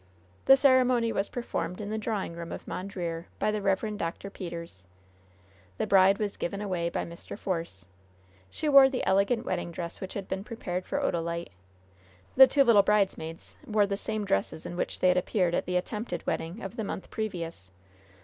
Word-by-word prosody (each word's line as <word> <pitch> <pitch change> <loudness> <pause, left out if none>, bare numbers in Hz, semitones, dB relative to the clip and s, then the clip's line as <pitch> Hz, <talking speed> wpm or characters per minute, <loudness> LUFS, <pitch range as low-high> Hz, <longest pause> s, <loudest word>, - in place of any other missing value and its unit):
The 270 - +8
ceremony 255 -4 +4
was 195 -1 -1
performed 235 -6 -4
in 210 0 -5
the 220 - -1
drawing 210 -5 -2
room 170 0 -7
of - - -7
Mondreer, 175 -3 -4
by 215 - +1
the 210 0 -2
Rev. 205 +2 0
Dr. 170 +3 -4
Peters. 170 - -7 0.9
The - - 0
bride 195 0 +5
was 210 -2 -3
given 200 +3 -3
away 180 -5 -1
by - - -2
Mr. 170 +3 -9
Force. 165 - -4 0.6
She 310 - -4
wore 275 -2 +8
the 265 - -2
elegant 200 +5 +2
wedding - - -2
dress 170 0 -6
which 190 - -6
had 195 -2 -4
been 190 0 -3
prepared 185 -5 -5
for - - -1
Odalite; 170 -2 -2 0.8
the 265 0 +10
two 280 0 +4
little 230 -5 +6
bridesmaids 195 -5 -1
wore 215 -2 +3
the 200 0 -2
same 215 +1 -3
dresses 155 - -1
in 175 - -5
which - - -3
they 185 - +5
had 180 - +3
appeared 180 -1 +1
at - - -1
the 180 0 +1
attempted 190 -1 -4
wedding 170 +8 -3
of 195 - -7
the 220 - -2
month 195 - -6
previous. 170 - -5
195 Hz, 185 wpm, -28 LUFS, 170-215 Hz, 0.9 s, the